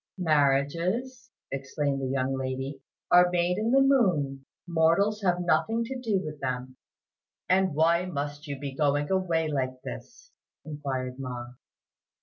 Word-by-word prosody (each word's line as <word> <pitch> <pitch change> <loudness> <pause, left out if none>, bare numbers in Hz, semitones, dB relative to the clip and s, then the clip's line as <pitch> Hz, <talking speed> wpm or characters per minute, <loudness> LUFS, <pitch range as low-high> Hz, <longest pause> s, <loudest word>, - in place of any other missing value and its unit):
"Marriages," 170 - +1 0.2
explained 135 +1 -2
the 135 - -1
young 135 0 0
lady, 135 +1 -4 0.3
"are 180 0 +7
made 180 +1 +1
in 220 +2 0
the 270 +1 +5
moon; 165 - +2 0.2
mortals 175 +6 +2
have 180 -2 +2
nothing 225 +6 +1
to 260 +3 -5
do 220 -6 0
with 150 -1 -6
them." 130 -1 -4 0.7
"And 185 -3 +2
why 170 +3 +3
must 145 -2 -4
you 140 -1 -4
be 140 0 -5
going 145 +3 +1
away 175 -4 +1
like 130 -3 -2
this?" - - -9 0.3
inquired 135 -4 -4
Ma. 125 -2 -5
150 Hz, 135 wpm, -27 LUFS, 135-185 Hz, 0.7 s, are